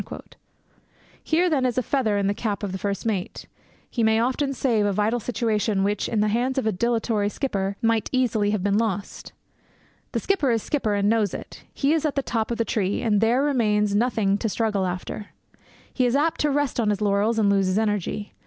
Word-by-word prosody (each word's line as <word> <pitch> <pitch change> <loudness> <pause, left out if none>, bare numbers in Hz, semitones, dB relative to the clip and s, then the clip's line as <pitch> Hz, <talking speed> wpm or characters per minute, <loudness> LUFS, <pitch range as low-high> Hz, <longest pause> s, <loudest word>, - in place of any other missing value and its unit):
Here, 340 +3 +2
then, 295 -6 +1
is 250 -2 0
a 255 - +2
feather 225 -6 0
in 200 - 0
the 200 - +1
cap 205 -1 -3
of 200 - -2
the 190 - -4
first 200 +3 -3
mate. 200 -5 -3 0.4
He 235 - -3
may 220 0 +3
often 260 +4 0
save 245 -5 +1
a - - +1
vital 215 +4 +1
situation 215 -4 0
which, 205 0 -1
in 220 -2 +1
the 210 - +2
hands 250 +5 0
of 265 - 0
a 220 - +2
dilatory 225 0 0
skipper, 200 -5 -2
might 225 -2 +1
easily 230 -5 +1
have 210 -3 -1
been 205 +1 +2
lost. 205 -3 -3 0.8
The - - 0
skipper 370 -9 +1
is 230 -3 +1
skipper, 225 -8 -1
and 200 0 +1
knows 215 -1 +1
it. - - -9
He 280 +2 +1
is 320 - +1
at 305 -2 -1
the 275 - 0
top 225 -3 -2
of 235 - -2
the 230 - 0
tree, 205 -3 -1
and 210 -3 +2
there 240 +4 +3
remains 210 -7 +1
nothing 205 -3 +1
to 225 - -1
struggle 210 -3 0
after. 185 +3 -5 0.7
He 255 -2 +2
is 240 - +1
apt 320 +3 +1
to 300 - +2
rest 290 -2 0
on 220 -3 +2
his 205 -1 0
laurels 205 +2 +1
and 205 -2 +3
lose 195 -1 +2
his 185 +2 0
energy. 210 -1 -1
220 Hz, 215 wpm, -24 LUFS, 205-250 Hz, 0.8 s, may